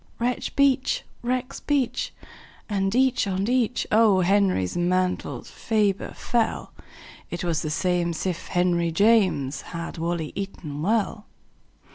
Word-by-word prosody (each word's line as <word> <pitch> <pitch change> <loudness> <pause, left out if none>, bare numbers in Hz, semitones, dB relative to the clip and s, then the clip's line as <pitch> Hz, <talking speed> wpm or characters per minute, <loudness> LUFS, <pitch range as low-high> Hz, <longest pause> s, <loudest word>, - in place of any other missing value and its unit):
Rexbeach! 260 +2 +1 0.2
rexbeach! 255 +1 -1 0.6
and 195 0 0
each 260 -4 +3
on 195 +1 -1
each 250 -1 +1
O. 215 -3 +5
Henry's 185 - +2
mantles 180 +1 -1
ferber 210 -3 0
fell. 235 -2 -1 0.6
It 175 - -4
was 165 -3 0
the 155 - -3
same'sif 175 +1 -1
henryjames 175 -4 +2
Had 170 -1 -6
wally 165 -2 -2
eaton 170 -7 -5
well. 210 +3 0
195 Hz, 100 wpm, -25 LUFS, 170-230 Hz, 0.6 s, O